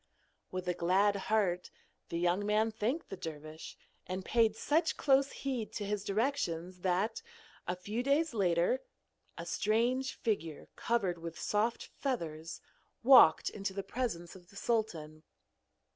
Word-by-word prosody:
With 185 -1 -5
a 180 - +2
glad 195 +4 +3
heart 200 -4 0 0.4
the 170 - -2
young 175 +3 +1
man 215 +2 +2
thanked 235 +9 -2
the - - -5
dervish, 155 -2 -8 0.3
and 185 +1 -4
paid 225 -2 +3
such 315 +8 +1
close 275 0 +3
heed 255 -5 -3
to 205 - -3
his 205 -1 -2
directions 195 - -1
that, 190 - 0 0.5
a 180 - 0
few 205 +6 -3
days 285 +3 +2
later, 180 +4 +2 0.6
a - - -6
strange 245 +5 +1
figure 165 - -2
covered 195 -7 0
with 165 0 -7
soft 215 +3 0
feathers 165 - -4 0.4
walked 245 -11 +7
into 195 -1 -4
the 195 0 -3
presence 195 -6 -3
of 180 -2 -15
the - - -18
sultan. 175 -9 -2
205 Hz, 140 wpm, -33 LUFS, 175-235 Hz, 0.6 s, walked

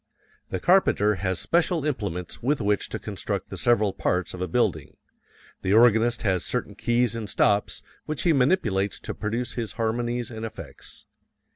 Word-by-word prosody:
The 95 - -3
carpenter 105 - +3
has 95 -2 0
special 170 -2 +1
implements 100 - -3
with 140 +4 +1
which 105 -2 0
to - - -3
construct - - -5
the - - -4
several 110 -5 +2
parts 90 -1 -1
of 90 - -7
a 90 - -1
building. 80 - -1 0.6
The 95 - +1
organist 115 +1 +4
has 95 -4 +1
certain - - -2
keys 120 -1 +1
and 110 -3 -5
stops 100 +1 +1 0.2
which 155 -1 -2
he 170 - +4
manipulates 125 - +1
to - - -5
produce 115 +3 -3
his 115 -3 -4
harmonies 120 +1 -2
and 110 -1 -7
effects. 115 - -9
115 Hz, 160 wpm, -25 LUFS, 100-125 Hz, 0.6 s, organist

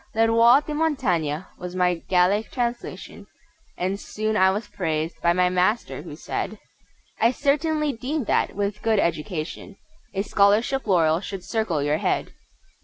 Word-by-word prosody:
Le 225 0 +4
Roi 235 +4 +6
de 300 - -6
Montagnes 185 - 0 0.2
was 180 0 -6
my 180 -1 +3 0.2
Gallic 190 +4 +3
translation, 240 -1 -4 0.5
And 190 +2 -2
soon 215 +1 -3
I 190 -2 +5
was 205 +3 -2
praised 160 -2 -3
by 170 - +3
my 180 +1 +3
master, 185 +5 0
who - - -9
said: - - -4 0.6
"I 230 - +5
certainly 300 +3 0
deem 270 +5 -3
that, - - 0
with 205 +1 -2
good 225 -1 +2
education, 170 +2 -2 0.4
A 195 - 0
Scholarship 215 +6 +2
laurel 165 -4 +3
should 195 -3 -6
circle 190 -8 -1
your 145 +1 +1
head!" - - -1
200 Hz, 150 wpm, -24 LUFS, 180-235 Hz, 0.6 s, Roi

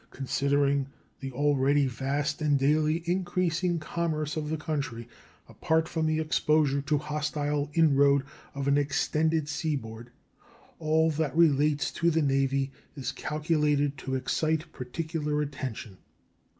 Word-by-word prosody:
Considering 140 0 0 0.3
the 135 0 -5
already 140 +1 +2
vast 140 +4 -2
and 145 -2 +3
daily 155 +4 +2
increasing 175 -1 0
commerce 155 -2 -2
of 150 -1 -3
the 160 - -1
country, 140 -7 -4 0.4
apart 160 0 0
from 160 -2 -1
the 155 0 +1
exposure 150 -2 +2
to 145 +2 0
hostile 150 -1 -2
inroad 140 -4 +4 0.3
of 140 0 -3
an 140 +1 +4
extended 155 +2 0
seaboard, 125 -7 -4 0.7
all 160 +1 +2
that 155 0 -2
relates 150 -3 +3
to 170 - +1
the 160 -1 +1
Navy 135 0 +1 0.2
is 135 -4 -3
calculated 150 -2 0
to 130 - -3
excite 155 +5 -1
particular 150 +3 -3
attention. 130 -9 -5
150 Hz, 125 wpm, -28 LUFS, 140-155 Hz, 0.7 s, inroad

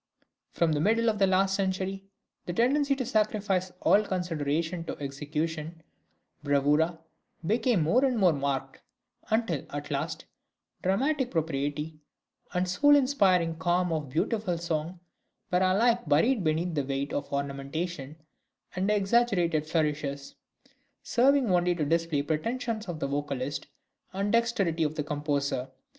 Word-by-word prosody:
From 170 -2 +1
the 150 - +1
middle 225 +6 +3
of 210 - -6
the 195 - +4
last 190 +1 +2
century 195 0 -2 0.4
the 175 - -2
tendency 275 +7 +2
to 265 -2 -3
sacrifice 210 -5 0
all 205 - +5
consideration 165 -2 -2
to - - -5
execution 155 +3 -4 0.6
(bravura) 150 +3 +2 0.5
became 220 - +2
more 235 - +3
and 260 -3 +2
more 185 -5 +4
marked; 135 -1 -3 0.5
until 220 - 0
at 145 0 -6
last, - - -3 0.6
dramatic 265 +8 +1
propriety, 150 - -2 0.5
and 180 +1 0
the - - -6
soul 290 +10 +5
inspiring 190 - +3
calm 175 +1 +1
of 150 -4 -3
beautiful 180 - -1
song, 165 +1 -3 0.5
were 180 - +3
alike 230 +6 +2
buried 215 - +3
beneath 165 +2 0
the 145 -3 0
weight 135 +1 -3
of 145 - -3
ornamentation 140 +2 -4 0.6
and 190 +2 0
exaggerated 195 -7 +2
flourishes, 150 -3 -1 0.7
serving 270 +1 +3
only 175 0 +2
to 155 -3 -1
display 165 -1 +1
the 145 - -10
pretensions 225 +6 -2
of 170 -3 -5
the 140 - -1
vocalist 140 -1 -3 0.5
and 200 +2 -1
the 230 - +7
dexterity 195 -9 -1
of 155 0 -1
the 150 - -1
composer. 145 -3 -2
170 Hz, 140 wpm, -28 LUFS, 150-205 Hz, 0.7 s, the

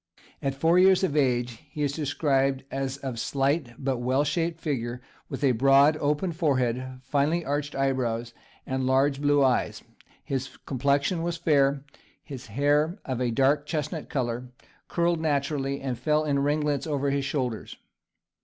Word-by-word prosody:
At 135 -1 -1
four 165 +5 +3
years 190 0 +5
of 155 -6 0
age 120 -5 +1
he 150 - -4
is 145 - +1
described 140 -3 0
as 135 0 -3
of 130 -4 -5
slight 135 -1 0
but 130 -2 -2
well 130 +3 +1
shaped 165 +3 -1
figure, 125 -6 -3 0.3
with - - -5
a 135 - +5
broad, 135 +5 +5
open 150 +4 0
forehead, 130 -6 -1
finely 145 +5 0
arched 145 +1 -2
eyebrows, 120 -4 -1 0.3
and 130 0 -2
large 135 +1 +2
blue 145 -1 +3
eyes; 130 -2 +1 0.4
his 135 -1 -4
complexion 140 +5 +1
was 170 0 -2
fair, 145 -5 +3
and 140 -1 -6 0.4
his 130 -5 -9
hair, 145 - +1
of 130 -2 -3
a 125 - +1
dark 140 +5 +2
chestnut 155 0 -3
colour, 125 -2 -2 0.4
curled 170 -1 +1
naturally, 140 -2 -1
and 130 -3 -3
fell 150 +3 +1
in 140 -2 +1
ringlets 145 +1 0
over 140 -2 0
his 140 0 0
shoulders. 130 -5 -3
140 Hz, 155 wpm, -26 LUFS, 130-150 Hz, 0.4 s, years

